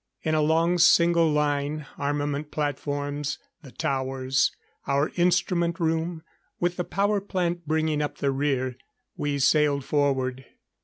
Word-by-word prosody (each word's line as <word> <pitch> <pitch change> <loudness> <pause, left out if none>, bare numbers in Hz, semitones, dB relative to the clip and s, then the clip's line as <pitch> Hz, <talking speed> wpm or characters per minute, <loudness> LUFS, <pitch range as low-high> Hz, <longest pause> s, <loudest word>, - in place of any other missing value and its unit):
In 155 - 0
a 155 - +3
long 165 +3 +2
single 170 -1 +5
line, 150 0 0
armament 145 0 -2
platforms, 145 -1 -3 0.2
the 140 -6 -13
towers, 130 0 0 0.4
our 140 +2 +1
instrument 175 -1 +1
room, 165 0 -1 0.4
with 175 0 0
the 180 - 0
power 200 +3 0
plant 175 -4 -2
bringing 155 -1 +1
up 145 - -3
the 140 - 0
rear, 135 -2 -1 0.4
we 145 -1 -1
sailed 140 0 +3
forward. 130 -3 0
150 Hz, 125 wpm, -26 LUFS, 140-170 Hz, 0.4 s, single